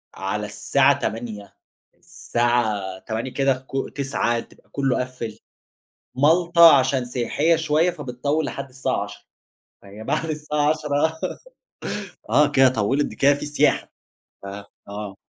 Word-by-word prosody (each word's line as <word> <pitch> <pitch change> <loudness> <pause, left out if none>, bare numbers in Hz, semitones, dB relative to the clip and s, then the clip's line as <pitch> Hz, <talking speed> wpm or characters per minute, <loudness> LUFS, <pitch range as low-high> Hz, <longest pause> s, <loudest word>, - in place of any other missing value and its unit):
على - - -3
الساعة - - +2
20:00 110 -2 -5 0.4
الساعة 110 -6 -1
20:00 115 +5 -4
كده 135 -1 0
ك 135 0 -3
21:00 130 -4 0
تبقى - - -14
كلّه 135 -2 0
قفِّل، 120 -4 -6 0.8
مالطا 170 +2 +6
عشان 130 -1 0
سياحية 135 +7 +1
شوية 160 +2 +2
فبتطوِّل 145 +3 -2
لحد 140 -1 -5
الساعة 130 +1 -2
22:00، - - -11 0.6
فهي 100 +2 -11
بعد 155 +5 -1
الساعة 150 -1 0
22:00 155 +1 0 1.1
آه، 150 0 +5
كده 135 -1 +6
طوّلِت، 130 +5 0
ده - - -9
كده 140 +1 +4
في 145 - -6
سياحة 145 - +1 0.5
آآ، 100 +1 -7 0.2
آه. 100 -1 -6
135 Hz, 125 wpm, -23 LUFS, 115-150 Hz, 1.1 s, مالطا